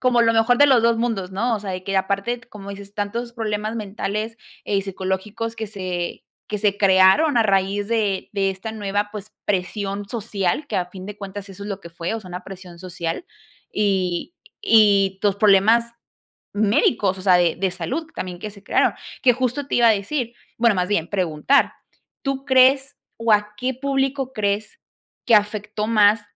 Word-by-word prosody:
como 250 -2 +3
lo 230 0 +4
mejor 225 +2 +3
de 290 - +7
los 260 -5 +5
2 230 0 +3
mundos, 220 -6 -1
¿no? 230 +4 0
O - - -7
sea, 200 -1 -5
de 185 0 -4
que 195 0 -1
aparte, 200 +5 -1
como 210 -4 -11
dices, 200 0 -10
tantos 230 +4 -3
problemas 215 -1 -3
mentales, 215 +1 -4 0.3
eh, 205 - 0
y 195 - +1
psicológicos 195 +4 -4
que 220 - -4
se 185 -4 -4 0.3
que 210 - -2
se 205 -1 +1
crearon 195 +10 +5
a - - +5
raíz 200 0 +1
de 210 -4 0
de 195 -1 +1
esta 195 +4 -6
nueva, 205 -1 -2
pues, 210 0 -8
presión 200 +1 -2
social 215 +2 -2
que - - -2
a 180 - 0
fin 185 +1 -10
de 210 - -7
cuentas 200 0 -7
eso 195 +1 -10
es 210 - -6
lo 200 0 -4
que 170 - -10
fue, 170 +3 -4
o 225 - -4
sea, 190 - -12
una 180 0 -7
presión 185 -2 -11
social, 175 - -4 0.5
y 190 - 0 0.3
y 200 - +4
los 205 -2 +2
problemas 215 +3 +4 0.6
médicos, 205 -2 +2
o - - -8
sea, 185 -1 +5
de 175 -2 +2
de 190 +1 0
salud 185 - -3
también 180 -1 -5
que 210 +4 -6
se 200 -1 -15
crearon. - - +2 0.3
Que 250 - +6
justo 255 +3 -1
te - - -3
iba 235 -1 +6
a - - +7
decir, 230 +4 -2 0.3
bueno, 230 -2 +4
más 180 0 0
bien 170 -5 0
preguntar, 185 - +2 0.5
¿tú 275 -1 -2
crees, 265 +1 +4 0.2
o 230 -1 +2
a 210 0 +2
qué 255 +2 -1
público 270 0 -1
crees 215 - -2 0.5
que 230 - +5
afectó 210 0 -1
más?, 210 -1 +4
205 Hz, 190 wpm, -22 LUFS, 195-230 Hz, 0.6 s, de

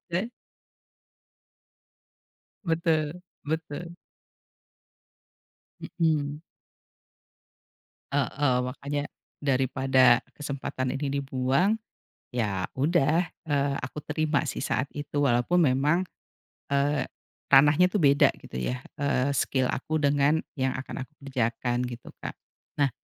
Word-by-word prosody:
gitu. 185 +7 -3 2.3
Betul, 165 -1 0 0.2
betul. 160 +2 -4 2.0
Mhm. 150 -2 +1 1.7
Heeh, 140 -1 +1
makannya, 145 +2 -3 0.4
daripada 130 -2 +4 0.2
kesempatan 135 -3 -3
ini 140 0 -1
dibuang 135 +10 +1 0.6
ya 105 -6 0
udah, 160 +3 +2 0.2
eee, 140 -2 +1
aku 130 +4 -5
terima 155 -2 +1
sih - - -3
saat 135 - 0
itu, 145 0 -3
walaupun 125 +8 +3
memang, 150 +5 +3 0.7
eee, 145 +1 +2 0.4
ranahnya 145 +5 +6
tuh 190 0 -1
beda 140 -1 +6
gitu 65 - -9
ya, 125 - -2 0.2
eee, 140 -1 +1
skill 130 0 +1
aku 155 +3 -2
dengan 145 +2 +3 0.2
yang 130 0 +1
akan 130 0 -5
aku - - -38
kerjakan 120 -2 -1
gitu, 120 -1 -9
Kak. - - -5 0.5
Nah 140 - +4
140 Hz, 95 wpm, -27 LUFS, 130-155 Hz, 2.3 s, ranahnya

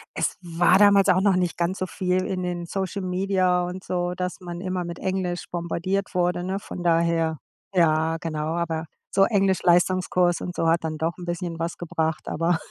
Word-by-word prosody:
es - - 0
war 175 +2 +3
damals 200 -1 +6
auch 185 +1 +4
noch 200 -2 +4
nicht 180 -2 0
ganz 175 +3 0
so 185 - -1
viel 185 0 -1
in 185 -1 -2
den 175 -1 -3
Social 190 +1 -3
Media 185 -1 +1
und 185 +1 -6
so, 180 0 -2
dass 180 +1 -3
man 175 0 -6
immer 185 -1 -2
mit 170 0 -6
Englisch 185 -2 -2
bombardiert 180 +3 -2
wurde, 175 0 +1
ne, 190 +1 -2
von 200 - -7
daher. 165 -1 +2 0.3
Ja, 160 -3 +2
genau, 160 -1 -3
aber 165 -2 -2 0.3
so 195 0 +5
Englisch-Leistungskurs 185 -3 +2
und 180 - -5
so 165 - 0
hat 165 0 +2
dann 155 -1 -3
doch 160 +2 -1
'n 175 - -7
bisschen 175 -1 -4
was 165 +1 -3
gebracht, 160 -2 -2
aber 165 +1 +1
175 Hz, 190 wpm, -24 LUFS, 170-185 Hz, 0.3 s, damals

